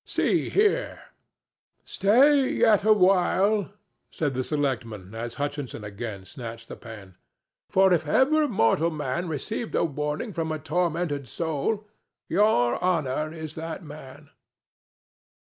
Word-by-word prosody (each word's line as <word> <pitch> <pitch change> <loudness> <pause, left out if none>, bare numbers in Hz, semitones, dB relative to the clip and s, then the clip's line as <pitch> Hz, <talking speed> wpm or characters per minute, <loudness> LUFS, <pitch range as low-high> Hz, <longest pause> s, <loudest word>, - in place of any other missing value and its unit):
See - - 0
here!" 425 +4 +1 0.9
"Stay 260 +7 +4
yet 215 -3 +3
a 215 - +4
while," 195 +1 +3 0.4
said 145 -4 -2
the 130 0 -1
selectman 115 -9 -3
as 115 +1 -5
Hutchinson 145 -5 -4
again 100 -1 -6
snatched 115 +2 -9
the - - -7
pen; 105 -6 -12 0.5
"for 190 -1 +4
if 160 -3 0
ever 300 - +3
mortal 165 - +2
man 155 +2 -3
received 215 - -4
a - - +2
warning 150 - -3
from 160 -2 -2
a 155 - -2
tormented 160 -2 -1
soul, 165 - -2 0.4
Your 150 - +2
Honor 155 -4 0
is 160 -2 -7
that 165 +3 -6
man." 145 -1 -12
155 Hz, 125 wpm, -26 LUFS, 130-190 Hz, 0.9 s, Stay